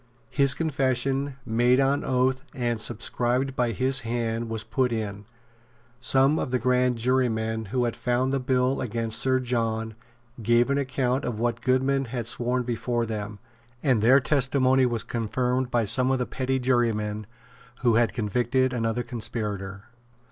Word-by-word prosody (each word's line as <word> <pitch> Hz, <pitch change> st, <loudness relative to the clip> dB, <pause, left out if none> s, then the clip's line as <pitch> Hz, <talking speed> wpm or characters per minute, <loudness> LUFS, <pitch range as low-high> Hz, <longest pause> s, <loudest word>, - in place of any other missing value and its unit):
His 140 Hz, -2 st, +3 dB
confession, 135 Hz, -2 st, 0 dB
made 120 Hz, +3 st, +3 dB
on 135 Hz, +1 st, +2 dB
oath 130 Hz, 0 st, +1 dB
and 120 Hz, -4 st, -1 dB
subscribed 125 Hz, +4 st, -1 dB
by 120 Hz, -2 st, +1 dB
his 130 Hz, +3 st, +1 dB
hand, 115 Hz, 0 st, -2 dB
was 110 Hz, -1 st, -3 dB
put 125 Hz, +3 st, 0 dB
in. 105 Hz, -3 st, -4 dB, 0.7 s
Some 135 Hz, +4 st, +3 dB
of -, -, -2 dB
the 125 Hz, -, +1 dB
grand 125 Hz, 0 st, +1 dB
jurymen 110 Hz, -2 st, 0 dB
who 125 Hz, +5 st, -1 dB
had 120 Hz, -, -2 dB
found 125 Hz, +2 st, 0 dB
the 135 Hz, -, +1 dB
bill 130 Hz, +1 st, +1 dB
against 115 Hz, -1 st, -2 dB
Sir 130 Hz, 0 st, +2 dB
John 115 Hz, -3 st, -2 dB, 0.5 s
gave 120 Hz, +4 st, +3 dB
an 140 Hz, -, +1 dB
account 130 Hz, 0 st, -1 dB
of 115 Hz, -3 st, -3 dB
what 120 Hz, 0 st, -1 dB
Goodman 135 Hz, +1 st, +1 dB
had 120 Hz, -1 st, -4 dB
sworn 125 Hz, +2 st, 0 dB
before 120 Hz, 0 st, -1 dB
them; 105 Hz, -1 st, -5 dB, 0.5 s
and 130 Hz, -7 st, +2 dB
their 130 Hz, +5 st, +6 dB
testimony 130 Hz, -2 st, +2 dB
was 120 Hz, -2 st, -1 dB
confirmed 125 Hz, +2 st, -1 dB
by 120 Hz, -2 st, +1 dB
some 125 Hz, +5 st, +3 dB
of 135 Hz, -, +2 dB
the 125 Hz, -, -1 dB
petty 130 Hz, +1 st, -2 dB
jurymen 110 Hz, -5 st, 0 dB, 0.5 s
who 120 Hz, -3 st, +3 dB
had 115 Hz, -2 st, +3 dB
convicted 120 Hz, +5 st, 0 dB
another 115 Hz, 0 st, -1 dB
conspirator. 105 Hz, -4 st, -5 dB
125 Hz, 155 wpm, -26 LUFS, 115-130 Hz, 0.7 s, their